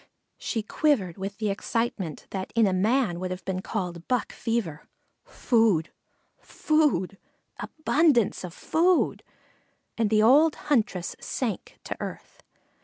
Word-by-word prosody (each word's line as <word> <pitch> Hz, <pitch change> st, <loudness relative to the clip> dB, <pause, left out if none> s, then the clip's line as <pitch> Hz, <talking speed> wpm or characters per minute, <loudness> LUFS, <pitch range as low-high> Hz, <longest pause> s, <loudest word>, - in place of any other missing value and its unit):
She 225 Hz, -3 st, -2 dB
quivered 215 Hz, -, 0 dB
with 195 Hz, +1 st, -5 dB
the 215 Hz, -2 st, -1 dB
excitement 200 Hz, -6 st, -3 dB
that 190 Hz, -1 st, -4 dB
in 230 Hz, -1 st, +5 dB
a 190 Hz, -, +1 dB
man 205 Hz, -1 st, +1 dB
would 185 Hz, 0 st, -3 dB
have 185 Hz, +1 st, -6 dB
been 185 Hz, -1 st, -2 dB
called 180 Hz, -5 st, -4 dB
buck 250 Hz, -3 st, -1 dB
fever. 225 Hz, -11 st, -3 dB, 0.4 s
Food 220 Hz, -9 st, +1 dB, 0.5 s
food 285 Hz, -, 0 dB, 0.4 s
abundance 305 Hz, -, +1 dB
of 180 Hz, -, -6 dB
food, 345 Hz, -, +1 dB, 0.8 s
and 225 Hz, -2 st, +2 dB
the 215 Hz, 0 st, +3 dB
old 290 Hz, +7 st, +5 dB
huntress 210 Hz, -10 st, -1 dB
sank 230 Hz, -8 st, -4 dB
to -, -, -5 dB
earth. -, -, -8 dB
215 Hz, 125 wpm, -26 LUFS, 185-255 Hz, 0.8 s, in